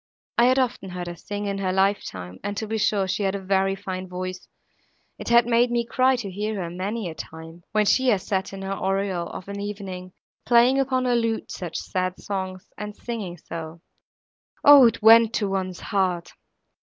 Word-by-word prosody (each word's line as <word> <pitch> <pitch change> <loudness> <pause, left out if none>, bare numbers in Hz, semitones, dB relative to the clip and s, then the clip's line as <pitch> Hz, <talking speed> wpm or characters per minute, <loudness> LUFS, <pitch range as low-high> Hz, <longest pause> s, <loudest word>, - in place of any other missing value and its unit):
I 235 - +6
had 255 +1 +4
often 250 -6 -1
heard 180 -1 -5
her 175 0 -6
sing, 205 +4 -5
in 200 -1 -2
her 190 -1 0
life 195 +2 +2
time, 90 -1 -8
and 205 0 -3
to 220 - -2
be 220 +1 -2
sure 200 -2 +1
she 190 - -1
had 195 -1 0
a - - -3
very 195 0 +1
fine 185 -1 -5
voice; 185 0 -6 0.7
it - - -5
had 235 0 +6
made 240 +1 +3
me 235 -1 0
cry 260 +2 +3
to 215 -6 -5
hear 210 +3 -3
her, 175 -4 -4
many 195 +4 -3
a 165 - -5
time, 160 +1 -10
when 215 0 +2
she 260 +5 +3
has 205 -6 +2
sat 190 -1 -1
in 195 0 -7
her 195 0 -2
oriel, 195 -2 -1
of 185 - -8
an 200 0 -5
evening, 195 -3 -6 0.3
playing 245 +3 +5
upon 260 -1 +1
her 250 - +2
lute 230 -1 -1
such 175 -3 -5
sad 185 0 -2
songs, 190 -2 -5
and 210 0 -6
singing 210 -8 -5
so. 165 0 -8 0.9
O! 285 -4 +10
it 230 - -2
went 225 0 +7
to 205 - 0
one's 190 -2 -3
heart! 180 -3 -1
195 Hz, 205 wpm, -24 LUFS, 185-225 Hz, 0.9 s, O